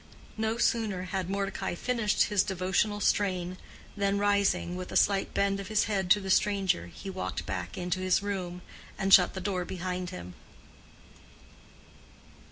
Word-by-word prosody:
No 220 +1 -1
sooner 220 -6 +1
had 185 -1 -3
Mordecai 195 -2 -2
finished 230 +1 +1
his 205 -2 +2
devotional 190 +2 0
strain, 185 -3 0 0.4
than 200 -1 +1
rising, 200 -3 +1
with 180 0 -6
a - - -6
slight 195 -1 +2
bend 200 0 +1
of 195 - -6
his 215 -1 +2
head 195 -4 -1
to 205 - +6
the 190 -1 -3
stranger, 195 - +2
he 185 - -11
walked 185 - -4
back 90 -2 -4
into 180 +1 -2
his 185 +1 +2
room, 180 -3 -4 0.3
and 195 0 +2
shut 180 0 +7
the - - -3
door 185 -1 -2
behind 180 0 -4
him. 90 0 -8
190 Hz, 155 wpm, -29 LUFS, 180-205 Hz, 0.4 s, shut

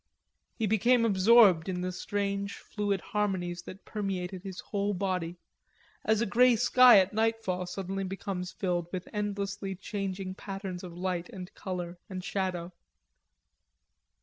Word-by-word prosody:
He 225 - -1
became 230 +3 +3
absorbed 195 -4 +6
in 180 -1 -2
the 185 0 -2
strange 200 +2 -2
fluid 205 -3 -2
harmonies 185 -4 -1
that 190 +2 -10
permeated 190 -3 -3
his 190 -1 -7
whole 205 0 -2
body, 180 -3 -2 0.7
as 220 0 +2
a - - +2
grey 245 +3 +5
sky 250 +1 +7
at 190 +1 +3
nightfall 220 -5 0
suddenly 195 +1 -3
becomes 185 -1 -4
filled 175 -3 -1
with 185 -1 -5
endlessly 200 -2 -3
changing 190 -1 -4
patterns 195 -2 -6
of 175 -2 -8
light 180 -1 -2
and 185 +1 -9
color 180 -2 -5
and 185 -1 -5
shadow. 185 -3 -2
195 Hz, 135 wpm, -30 LUFS, 180-205 Hz, 0.7 s, sky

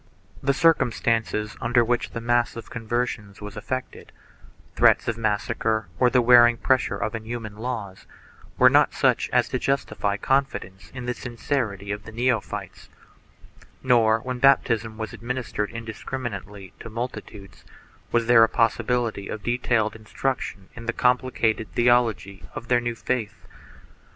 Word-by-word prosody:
The 140 0 +1
circumstances 115 -8 +1
under 120 -1 +3
which 120 +1 0
the 115 - -6
mass 120 0 +1
of 115 - -9
conversions 115 -3 -3
was 105 -1 -8
effected 130 +5 -6 0.3
— - - -26
threats - - +4
of 115 - 0
massacre 110 -1 -1
or 125 - +5
the 125 -1 +3
wearing 120 -1 +7
pressure 130 +2 +1
of 110 - -3
inhuman 115 -1 -6
laws 110 -5 -5 0.2
— - - -25
were - - +7
not - - +4
such - - +2
as - - +3
to - - -2
justify 105 -7 -1
confidence 135 -8 -1
in 125 -1 -6
the 125 - -1
sincerity 115 -5 -3
of 105 +1 -4
the - - -9
neophytes, 120 +1 -2 0.9
nor, 115 -3 +4
when 125 0 -4
baptism 115 -5 +3
was 110 +2 -5
administered 115 -2 -3
indiscriminately 110 -4 -7
to 115 - -8
multi 120 +3 -4
tudes, 100 -3 -14 0.5
was 120 -1 +2
there 115 -1 +7
a 115 - +4
possibility 115 -2 0
of 105 - -6
detailed 120 -3 0
instruction 110 -3 -4
in 115 0 -10
the 120 - 0
complicated 125 -4 +1
theology 120 -5 +1
of 115 - -7
their 120 -1 +3
new 120 -1 -3
faith. 115 -4 -3
115 Hz, 145 wpm, -24 LUFS, 110-125 Hz, 0.9 s, wearing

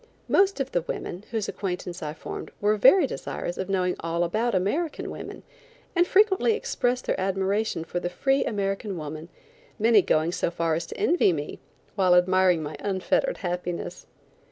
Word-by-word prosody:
Most 390 -3 +3
of 270 -1 -2
the 175 - +1
women, 175 +3 -6
whose 220 -3 -2
acquaintance 180 -2 -4
I 150 -1 -4
formed, - - -7
were 210 +1 +2
very 265 - +6
desirous 175 - -5
of 190 - -3
knowing 180 -2 +1
all 165 +1 -1
about 220 +6 0
American 285 - -1
women, - - -8 0.5
and 350 0 +4
frequently 415 +2 +4
expressed 250 - -1
their - - -1
admiration 195 -1 0
for 175 +2 -3
the 175 - -3
free 270 +10 +1
American 195 -1 -2
woman, 155 +1 -7 0.5
many 220 -1 +5
going 160 -1 +1
so 175 - -1
far 170 -1 -1
as 165 +1 -2
to - - -8
envy 360 - +3
me, 150 -3 -4 0.3
while 185 -3 +4
admiring 180 -2 +4
my 150 0 -5
unfettered 200 - 0
happiness. 175 0 -4
190 Hz, 165 wpm, -26 LUFS, 175-230 Hz, 0.5 s, very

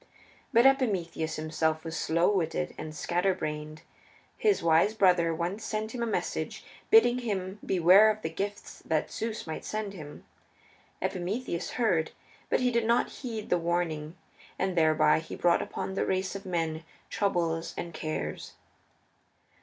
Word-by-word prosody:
But 235 -1 +5
Epimetheus 190 - +2
himself 155 0 -1
was 165 -1 -5
slow 170 +4 +2
witted 175 -2 -1
and 155 0 -7
scatter 180 +4 0
brained. 155 +1 -5 0.5
His 420 -2 +2
wise 165 +6 +4
brother 180 -5 +4
once 175 +6 -3
sent 220 0 -3
him 245 - -4
a 235 - 0
message 220 - -3 0.2
bidding 250 - +6
him 200 -4 -3
beware 190 +4 +6
of 215 0 -2
the 160 - -1
gifts 200 +4 -5
that 155 -1 0
Zeus 225 0 -4
might 160 -1 -5
send 215 -2 -4
him. 150 -6 -10 0.8
Epimetheus 180 -1 -3
heard, 180 -10 +1 0.4
but - - +2
he 250 -1 +2
did 235 -1 +1
not 235 +1 +2
heed 225 -5 -5
the 180 - +4
warning, 165 -2 -2 0.4
and 190 -1 -1
thereby 155 -2 +4
he 160 - -8
brought 175 -1 +3
upon 190 - -4
the - - 0
race 190 +1 -1
of 195 0 -7
men 165 -3 -2 0.3
troubles 170 -4 -1
and 170 - -5
cares. 155 0 -4
180 Hz, 150 wpm, -29 LUFS, 160-215 Hz, 0.8 s, bidding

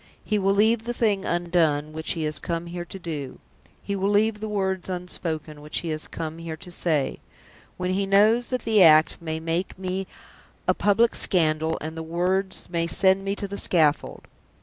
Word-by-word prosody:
He 210 -1 +1
will 195 0 +2
leave 220 +2 +3
the 240 0 -3
thing 205 -5 +1
undone 165 -4 +1
which 160 0 -1
he 165 - -3
has 150 -2 -1
come 170 +2 -3
here 175 0 -6
to 195 - -8
do; 150 -7 -6 0.5
he 200 - -2
will 195 +1 0
leave 210 +1 +2
the 215 0 -4
words 190 -3 -2
unspoken 165 -4 -5
which 150 +1 -2
he 170 - -4
has 155 -1 -3
come 160 0 -6
here 165 -1 -6
to 180 - -9
say 155 -5 0 0.6
when 180 0 -1
he 195 +1 0
knows 215 +5 +4
that 255 -1 -3
the 220 -3 +3
act 155 0 +6
may 160 -1 -3
make 165 +4 -2
me 190 0 -3 0.6
a - - +5
public 225 +3 +3
scandal, 160 -3 +1
and 155 - -4
that 160 - -5
the 160 - -8
words 185 +3 -1
may 170 -1 -1
send 190 +2 +3
me 195 0 -1
to 200 - -4
the 200 +1 -3
scaffold!" 155 -4 +1
180 Hz, 195 wpm, -25 LUFS, 160-195 Hz, 0.6 s, act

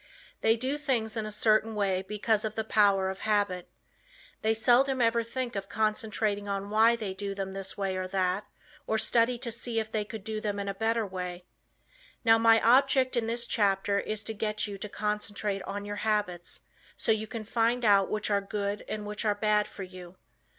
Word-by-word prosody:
They 225 +1 +4
do 265 +5 -2
things 240 -6 -1
in 220 -1 -2
a - - -6
certain 215 +1 +2
way 195 -3 +1
because 210 +2 0
of 215 -1 -3
the 220 - -1
power 200 -3 +3
of 190 - -8
habit. 205 -4 0 0.7
They 220 +1 +2
seldom 255 +4 +3
ever 230 -1 +3
think 240 +1 -4
of 195 0 -4
concentrating 215 -1 -1
on 200 0 -3
why 225 +2 +5
they 210 -5 -4
do 200 +1 -4
them 195 -1 -4
this 195 0 -5
or 190 -2 -2
that 185 +1 0
way, - - -33 0.4
or 220 - +1
study 230 +2 +2
to 235 0 -4
see 230 0 -2
if 220 0 -4
they 215 -1 0
could 215 -1 -8
do 215 0 -4
them 205 -1 -2
in 200 0 -3
a 200 - -1
better 225 +2 0
way. 180 -2 -6 0.8
Now 225 0 +6
my 225 0 +6
object 260 +2 +4
in 230 -2 0
this 235 +1 -2
chapter 200 -2 +1
is 215 +1 -3
to 220 - -3
get 215 0 -1
you 200 -2 -6
to 210 - -6
concentrate 210 -1 -2
on 205 +1 -5
your 205 0 -5
habits 205 -5 -2 0.4
so - - +1
you 220 0 0
can 225 0 -5
find 230 +2 +1
out 200 -2 +5
which 215 0 -1
are 200 0 +3
good 200 0 -3
and 210 -1 -4
which 210 +1 -4
are 210 -2 +2
bad 210 0 +2
for 195 - -8
you. 180 -1 -11
210 Hz, 205 wpm, -29 LUFS, 200-225 Hz, 0.8 s, Now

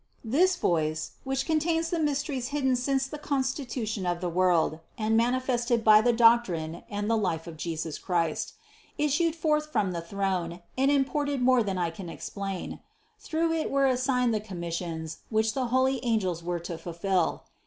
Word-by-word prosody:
114. 255 +8 +1
This 370 0 +5
voice 160 - 0
(which 270 0 -1
contains 325 +1 +1
the 340 - 0
mysteries 285 -4 -1
hidden 275 -3 +1
since 270 +2 0
the 300 +2 -7
constitution 260 -8 -2
of 175 -1 0
the 180 0 -2
world 175 -3 +2 0.2
and 220 0 +1
manifested 240 0 +1
by 215 -1 +7
the 240 +2 +3
doctrine 230 -9 +3
and 205 -1 -3
the 230 - +2
life 180 -7 -1
of 170 -2 -8
Jesus 160 -1 -4
Christ), 165 -3 -1 0.4
issued 300 +3 +1
forth 305 -1 0
from 195 -9 +1
the 170 -1 -3
throne 180 -1 -2
and 270 +1 +3
imported 285 0 +1
more 255 -1 +5
than 195 -4 -2
I 175 -2 0
can 175 +1 -8
explain. 195 +2 -5 0.4
Through 330 -6 0
it 320 -1 -1
were 275 0 +2
assigned 250 -2 +2
the 215 - +1
commissions, 170 -4 -5
which 220 0 +1
the 260 -2 -1
holy 260 +1 +1
angels 195 -8 0
were 175 0 -2
to 170 -1 -6
fulfill. 175 +1 -1
230 Hz, 170 wpm, -28 LUFS, 175-270 Hz, 0.4 s, by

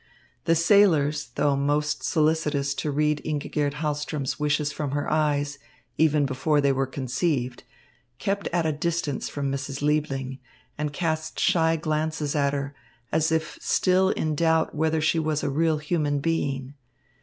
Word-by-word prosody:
The 165 0 +4
sailors, 160 - +3
though 145 -1 +2
most 145 +1 0
solicitous 150 -2 +1
to 140 +2 -3
read 150 +1 +1
Ingigerd 145 -1 -1
Hahlström's 150 -2 -3
wishes 150 0 +1
from 145 -3 -4
her 145 0 -1
eyes, 145 -2 0 0.4
even 150 -2 +3
before 140 +3 +1
they 140 -1 +3
were 135 0 0
conceived, 130 -1 -2 0.6
kept 195 +9 -2
at 170 -1 +1
a 160 - +2
distance 155 -1 -2
from 140 -1 -2
Mrs. 140 +1 -4
Liebling 135 -3 -1 0.4
and 150 0 -2
cast 160 0 -2
shy 165 -1 +3
glances 155 -1 -1
at 140 -1 +2
her, 140 0 -3 0.4
as 160 +1 +2
if 160 0 -1
still 185 0 +3
in 155 -5 0
doubt 160 +1 +2
whether 160 +1 +1
she 155 +2 +2
was 155 -1 -1
a 145 - 0
real 160 +2 +2
human 150 -1 0
being. 140 -4 -1
150 Hz, 150 wpm, -25 LUFS, 140-160 Hz, 0.6 s, The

